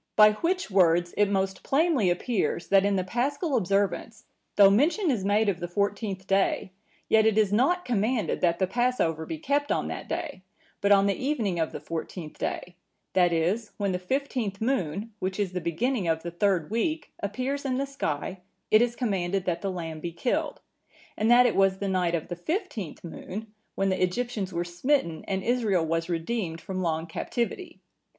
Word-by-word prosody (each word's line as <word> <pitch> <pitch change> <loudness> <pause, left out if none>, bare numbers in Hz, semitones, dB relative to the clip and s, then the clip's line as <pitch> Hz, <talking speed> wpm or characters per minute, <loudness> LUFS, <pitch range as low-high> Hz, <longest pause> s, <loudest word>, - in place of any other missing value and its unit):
By 210 0 +8
which 345 - -1
words 175 -2 +3
it 205 - +3
most 190 -1 -1
plainly 280 - +2
appears, 180 0 -1
that 195 0 +5
in 200 0 +2
the 185 - +1
Paschal 270 - -1
observance, 200 +1 0 0.3
though 200 -1 +8
mention 310 - +3
is 220 -7 -1
made 205 +2 +2
of 190 -4 0
the 175 - -3
fourteenth 200 +1 -2
day, 195 -1 +1 0.4
yet 220 0 +4
it 220 -1 +2
is 210 -2 +3
not 350 +11 +2
commanded 230 0 0
that 170 -1 +2
the 190 - +2
Passover 190 -7 0
be 320 - -4
kept 290 -1 0
on - - 0
that - - -6
day; 290 - -4 0.4
but 200 - +2
on 200 -1 +6
the 200 - +2
evening 225 - -1
of 160 - 0
the - - -6
fourteenth 165 -1 -6
day, 180 - -4 0.4
that 180 -2 +4
is, 180 +7 0
when 200 -2 0
the 180 - -1
fifteenth 230 -1 -2
moon, 220 - -1
which 190 +2 -3
is 200 -3 0
the 180 -1 -3
beginning 195 +5 -1
of 160 0 0
the 170 - -4
third 180 -1 0
week, 305 +8 -1
appears 255 +8 -2
in 260 -2 -1
the 275 - 0
sky, 190 - -3 0.3
it 215 - +7
is 240 0 +1
commanded 195 -5 -1
that 170 -2 -1
the 195 - -2
lamb 165 -3 -5
be 170 +2 -4
killed; 240 +9 -2 0.5
and 215 +2 +1
that 245 +1 +7
it 245 - +2
was 195 -1 +3
the 200 - -3
night 180 -3 +1
of 160 - -3
the 175 - -4
fifteenth 225 - -4
moon, 210 +5 -7 0.2
when 195 0 +1
the 185 - -1
Egyptians 195 +1 -1
were 170 0 -2
smitten 175 - 0
and 190 -1 -1
Israel 220 -8 +1
was 165 +1 -1
redeemed 170 0 -2
from 185 +2 -4
long 160 -2 -1
captivity. 245 - -4
200 Hz, 190 wpm, -27 LUFS, 175-240 Hz, 0.5 s, By